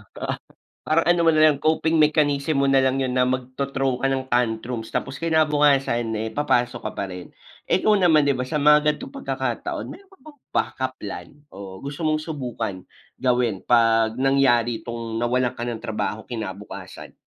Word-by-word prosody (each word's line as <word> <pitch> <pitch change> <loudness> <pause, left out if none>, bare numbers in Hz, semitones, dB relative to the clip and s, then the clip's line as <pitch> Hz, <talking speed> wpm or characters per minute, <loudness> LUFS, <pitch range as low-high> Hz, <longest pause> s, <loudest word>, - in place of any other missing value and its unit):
di - - -10
ba? - - -5 0.6
Parang 160 +2 +2
ano 175 0 +3
mo 165 - +4
nalang, 155 -2 +4
coping 160 +1 +2
mechanism 150 -1 +2
mo - - +3
nalang 135 -1 +3
yun 130 -1 -2
na 125 0 +2
magto-throw 135 +1 -2
ka 135 - +2
ng 135 -1 -1
tantrums. 115 -1 -1
Tapos 135 +3 -3
kinabukasan 145 -7 +2
eh 110 - -3
papasok 125 -4 +1
ka - - -10
pa 100 - -1
rin. 90 0 -8 0.4
Ikaw 210 +3 +3
naman, 160 -5 +4
di 140 - +3
ba, 125 - -3
sa 150 - -1
mga 150 +1 +6
ganitong - - -10
pagkakataon, 275 - -3
meron 395 0 -13
ka 385 - -21
bang 300 -2 -14 0.2
backup 130 0 -1
plan, 90 -4 -7 0.3
o 95 -1 -9
gusto 140 +3 -6
mong 155 0 +2
subukan 125 - -4 0.4
gawin 120 -6 +1
'pag 115 -1 +3
nangyari 125 -4 +2
'tong 115 -1 -5
nawalan 125 +1 +1
ka - - -9
ng 120 - -3
trabaho 110 0 -3
kinabukasan? 105 -4 -8
130 Hz, 170 wpm, -23 LUFS, 115-150 Hz, 0.6 s, mga